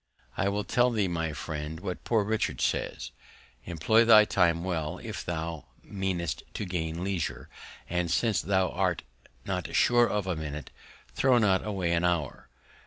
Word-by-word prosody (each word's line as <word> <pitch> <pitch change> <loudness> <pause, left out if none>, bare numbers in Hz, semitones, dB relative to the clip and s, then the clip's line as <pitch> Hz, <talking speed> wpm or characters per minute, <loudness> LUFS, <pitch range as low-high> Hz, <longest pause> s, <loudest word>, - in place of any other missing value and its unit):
I 100 - +1
will 100 +1 -1
tell 120 +4 +3
thee, 110 -5 +1
my 80 -2 -2
friend, 75 +1 -5
what 90 -1 -5
Poor 110 -3 +2
Richard 110 +2 -1
says, - - -2 0.5
Employ 90 +8 +3
thy 110 -2 +8
Time 85 -4 +2
well, 80 -5 -2
if - - -6
thou 80 -2 -4 0.2
meanest 95 -5 -3
to 105 - -3
gain 85 -2 -3
Leisure; 80 -8 -3 0.4
and, 90 0 -1
since 110 +3 +1
thou 95 -1 +1
art 90 -2 -1 0.4
not - - -3
sure 120 -1 +4
of 105 -2 -1
a 90 -2 -1
Minute, 75 -3 -6 0.4
throw 130 - +3
not 100 -5 +3
away 95 -5 -1
an 85 0 +1
Hour. 85 -5 -1
90 Hz, 160 wpm, -28 LUFS, 80-105 Hz, 0.5 s, thy